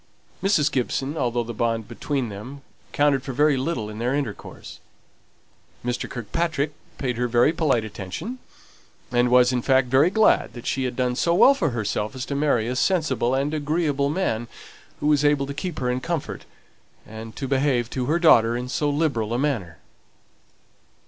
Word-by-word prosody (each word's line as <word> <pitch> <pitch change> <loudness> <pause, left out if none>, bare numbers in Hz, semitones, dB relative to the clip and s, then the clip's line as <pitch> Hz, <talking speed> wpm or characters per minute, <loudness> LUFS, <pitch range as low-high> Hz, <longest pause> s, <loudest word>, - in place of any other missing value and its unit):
To 195 - 0
Mrs. 150 -7 +3
Gibson, 135 +3 -1
although 120 -5 0
the 120 +1 -6
bond 115 0 -1
between 125 +1 -3
them 125 +8 -9 0.3
counted 145 -2 +2
for 135 0 -6
very 145 +2 +3
little 130 -5 -2
in 105 0 -8
their 125 +3 0
intercourse, 140 -8 -6 1.1
Mr. 125 0 -2
Kirkpatrick 145 +5 -2 0.2
paid 125 -3 -2
very 120 +6 +3
polite 140 -9 +1
attention; 110 - -6 0.7
and 120 0 +2
was, 125 0 +5
in 125 -1 0
fact, 130 0 +2
very 135 +6 +4
glad 220 +3 +3
that 120 -1 -10
she 130 -1 -1
had 125 -1 -3
done 125 -1 0
so 170 +6 +1
well 265 +9 +7
for 275 - 0
herself 110 -2 -2
as 130 - -4
to 140 - -4
marry 140 -6 +1
a 125 - -2
sensible 130 -6 +1
and 140 +3 -1
agreeable 150 -2 0
man, 130 -9 -1 0.5
who - - -3
was 150 -1 +3
able 145 -1 +3
to 140 - -6
keep 175 +1 -5
her 125 -1 -1
in 125 - -1
comfort, 165 +2 -4 0.6
and 110 +1 -9
to 135 - -4
behave 130 -3 +1
to 130 -2 -2
her 160 +4 +2
daughter 120 -9 +5
in 125 +1 -5
so 145 +3 0
liberal 140 -7 0
a - - 0
manner. 115 - -2
130 Hz, 175 wpm, -24 LUFS, 120-150 Hz, 1.1 s, well